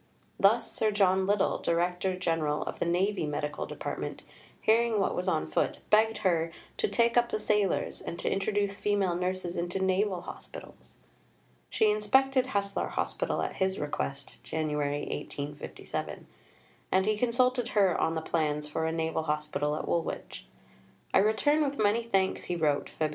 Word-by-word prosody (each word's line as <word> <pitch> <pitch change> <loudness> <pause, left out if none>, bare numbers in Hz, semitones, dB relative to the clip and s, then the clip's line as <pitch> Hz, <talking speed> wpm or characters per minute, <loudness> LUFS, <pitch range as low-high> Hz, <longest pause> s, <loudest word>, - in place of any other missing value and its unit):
Thus 225 +4 +4
Sir 220 - +1
John 190 -2 +3
Liddell, 205 0 +2
Director 180 +2 0
General 160 -4 0
of - - -6
the - - 0
Navy 180 0 +1
Medical 150 0 -3
Department, - - -5 0.4
hearing 225 0 +3
what 195 - +1
was 180 - -2
on 160 -4 +1
foot, - - -1
begged 220 +1 +4
her 165 -2 +2 0.3
"to 460 -3 +1
take 235 - +2
up 240 0 +4
the - - -1
sailors," 210 -2 0
and 170 - -6
to - - -4
"introduce 200 0 0
female 200 -3 +1
nurses 180 0 -2
into 175 +2 -2
naval 190 0 +1
hospitals." - - -11 0.7
She 215 -1 +3
inspected 260 +5 +3
Haslar 200 -4 -1
Hospital - - -1
at - - -4
his 190 0 0
request 70 - -4
(Jan. 155 -2 -2
1857), 145 0 -4 0.7
and 190 0 +3
he 215 0 +2
consulted 245 +2 +2
her 195 -4 +5
on 160 - +1
the 160 - -1
plans 150 -2 -1
for 160 +2 -2
a - - 0
Naval 160 0 -1
Hospital 150 -1 -1
at - - -4
Woolwich. 170 -1 -3 0.7
"I - - +6
return 255 +9 +3
with 280 -1 -2
many 215 +2 +3
thanks," 195 -5 0
he 175 - -2
wrote 150 -4 +1
(Feb. 155 -1 +2
190 Hz, 160 wpm, -29 LUFS, 160-215 Hz, 0.7 s, I